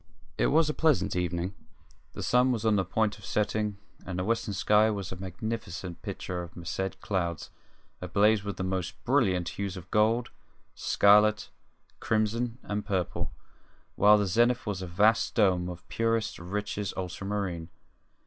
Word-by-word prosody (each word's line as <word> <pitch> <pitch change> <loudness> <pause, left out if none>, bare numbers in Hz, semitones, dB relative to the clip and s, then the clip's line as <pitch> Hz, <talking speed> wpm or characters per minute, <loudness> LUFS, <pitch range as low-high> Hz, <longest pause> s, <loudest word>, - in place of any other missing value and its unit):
It - - +2
was 155 +1 +4
a 150 - 0
pleasant 155 - +2
evening. 90 +1 -1 0.6
The - - -6
sun 125 +1 +3
was 115 -3 -2
on 110 -1 +4
the 95 - +2
point 105 +3 0
of - - -16
setting, 105 0 -1 0.3
and 90 -1 -5
the 90 - -1
western 110 -1 -1
sky 105 +2 +4
was 100 -3 -3
a - - -4
magnificent 95 -1 -5
picture 90 -1 -4
of 85 0 -10
massed 90 +2 -4
clouds 85 -5 -2 0.5
ablaze 100 +4 +3
with 100 -1 -5
the 95 - -2
most 95 -1 -3
brilliant 100 -10 +2
hues 100 -1 -4
of 90 0 -11
gold, 115 +3 +2 0.4
scarlet, 105 +1 +4 0.5
crimson, 115 +2 0
and 105 0 -3
purple, 95 -4 -2 0.6
while 105 +1 +6
the 105 - +1
zenith 120 +6 +2
was 100 -3 -3
a 95 - -5
vast 105 +6 +2
dome 90 -5 +3
of 90 0 -9
purest, 115 -1 -1
richest 100 +3 -4
ultramarine. 95 -2 -3
100 Hz, 155 wpm, -28 LUFS, 90-110 Hz, 0.6 s, while